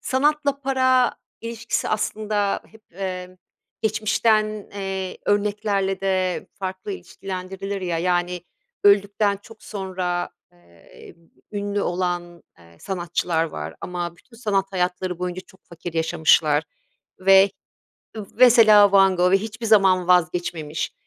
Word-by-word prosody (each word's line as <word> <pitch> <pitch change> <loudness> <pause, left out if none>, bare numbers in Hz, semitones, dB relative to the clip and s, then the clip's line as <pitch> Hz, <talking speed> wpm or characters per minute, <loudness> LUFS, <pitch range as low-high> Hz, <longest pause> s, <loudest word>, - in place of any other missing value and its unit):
sanatla 285 +1 +1
para 260 -2 +2 0.3
ilişkisi 230 0 -3
aslında 210 -1 -1
hep, 220 0 -19
eee, 185 -1 -6 0.4
geçmişten, 215 0 +1
eee, 190 -2 -4
örneklerle 205 -2 0
de 185 -2 -1
farklı 190 +1 -5
ilişkilendirilir 195 +1 -6
ya. 175 -3 -2
Yani, 180 0 0 0.4
öldükten 200 0 +3
çok 225 -1 -15
sonra, 185 -3 -3 0.2
eee, 85 -1 -17 0.4
ünlü 205 0 -2
olan, 175 -1 -3 0.2
eee, 85 -1 -19
sanatçılar 175 -2 -1
var 80 - -6
ama 175 -1 -5
bütün 230 +4 -20
sanat 200 -4 -1
hayatları 180 -1 -2
boyunca 180 0 -4
çok 190 - -22
fakir 170 0 -8
yaşamışlar 160 -2 +3 0.6
ve 195 +1 +6 0.8
mesela 215 -5 +7
Van 195 -1 +5
Gogh 180 +1 +3
ve - - +7
hiçbir 225 +3 -6
zaman 190 -4 +4
vazgeçmemiş. 165 -3 0
190 Hz, 110 wpm, -23 LUFS, 180-210 Hz, 0.8 s, mesela